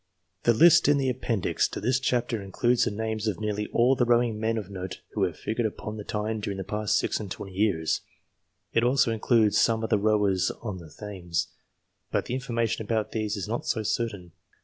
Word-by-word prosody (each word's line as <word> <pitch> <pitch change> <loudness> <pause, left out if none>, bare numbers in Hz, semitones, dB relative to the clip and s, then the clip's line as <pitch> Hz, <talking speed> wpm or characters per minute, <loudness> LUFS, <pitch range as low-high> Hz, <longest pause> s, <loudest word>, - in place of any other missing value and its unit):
The 120 - +6
list 170 +7 +7
in 145 0 +5
the 135 -2 +1
Appendix 120 -5 0
to - - -6
this 125 +4 +1
chapter 120 -4 0
includes 120 +5 +1
the - - +1
names 110 +1 -3
of 105 -3 -1
nearly 105 -1 -2
all 125 +3 +3
the 125 - +2
rowing 120 -2 +2
men 115 +1 0
of 105 -4 -4
note 95 -3 -6
who - - -3
hav.e - - -4
figured 110 +1 -1
upon 105 +1 -7
the 105 - -6
Tyne 105 +2 -2
during 100 -1 -4
the 95 - -3
past 105 +2 0
six - - 0
and 105 -3 -6
twenty 95 +1 -7
years. 90 -6 +1 0.7
It 115 - +3
also 125 -1 +3
includes 110 -1 +3
some 115 -1 +2
of 110 - -3
the 105 - +4
rowers 100 -3 +2
on 105 -5 -4
the 80 -2 -12
Thames, 90 -4 -4 0.6
but - - 0
the - - -4
information 115 -4 -1
about 110 0 -1
these 110 -1 -2
is 100 - -4
not 115 +3 -3
so 110 - 0
certain. 100 -5 -2
110 Hz, 210 wpm, -27 LUFS, 100-120 Hz, 0.7 s, list